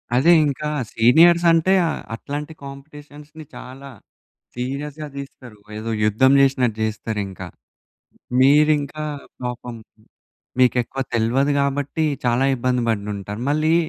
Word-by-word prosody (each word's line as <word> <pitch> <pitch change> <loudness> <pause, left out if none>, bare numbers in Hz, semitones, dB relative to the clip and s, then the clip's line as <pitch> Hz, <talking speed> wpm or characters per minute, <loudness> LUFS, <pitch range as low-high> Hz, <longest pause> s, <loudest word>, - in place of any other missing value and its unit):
అదే 155 +7 +4 0.2
ఇంకా 145 +2 -3 0.3
సీనియర్స్ 170 +9 +5
అంటే 165 +3 +3
ఆహ్, - - -3
అట్లాంటి 150 +5 -6
కాంపిటీషన్స్‌ని 145 +2 -12
చాలా 135 +2 -10 0.7
సీరియస్‌గా 140 +4 -5
దీస్తారు. 130 -5 -10 0.2
ఏదో 115 +1 -5
యుద్ధం 110 +6 +3
జేశినట్టు 130 -5 +2
జేస్తారింకా. 105 -4 -4 0.9
మీరింకా 150 +2 +3 0.4
పాపం, 125 -1 -5 0.8
మీకు 125 -2 +4
ఎక్కువ 135 +3 -6
తెల్వదు 120 +5 +1
గాబట్టి 140 +3 -1 0.2
చాలా 120 +2 +2
ఇబ్బంది 125 -1 -1
పడినుంటారు. 105 -1 -4
మళ్ళీ 155 +2 +2
135 Hz, 105 wpm, -21 LUFS, 120-150 Hz, 0.9 s, సీనియర్స్